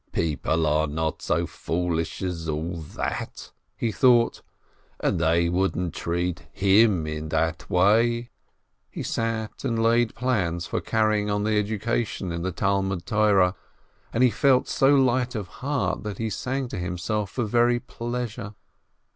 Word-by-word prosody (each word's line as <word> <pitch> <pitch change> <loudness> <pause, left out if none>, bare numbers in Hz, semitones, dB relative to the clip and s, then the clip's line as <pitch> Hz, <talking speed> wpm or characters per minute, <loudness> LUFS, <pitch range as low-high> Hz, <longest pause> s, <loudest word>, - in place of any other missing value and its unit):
"People 80 0 0
are 75 +1 +2
not 80 +1 -2
so - - 0
foolish 85 0 -2
as 85 -3 -3
all 80 +3 -2
that," 80 -3 -5 0.3
he 115 - -1
thought, 120 +1 +4 0.6
"and - - 0
they 85 +1 +3
wouldn't 90 -1 0
treat 85 +1 -2
him 100 -3 +4
in 75 0 -4
that 80 +2 -1
way 115 +6 +3 0.3
!" - - -49
He - - -6
sat 115 -1 -3
and 115 - 0
laid 115 0 +3
plans 95 -9 0
for - - -2
carrying 110 -2 +1
on 105 0 0
the 110 0 +1
education 105 -2 -1
in 85 0 -3
the 95 +2 -2
Talmud 95 -1 -1
Torah, 100 -4 +3 0.6
and 120 - +2
he 125 - +5
felt 130 -1 +3
so 135 +2 +4
light 130 -2 +2
of 105 -4 -3
heart 140 0 -1
that 105 -2 -5
he 110 -1 -2
sang 130 +4 -2
to 90 - -5
himself 95 +4 -2
for 120 - -2
very 120 +2 +3
pleasure. 120 -3 -5
105 Hz, 150 wpm, -25 LUFS, 85-115 Hz, 0.6 s, he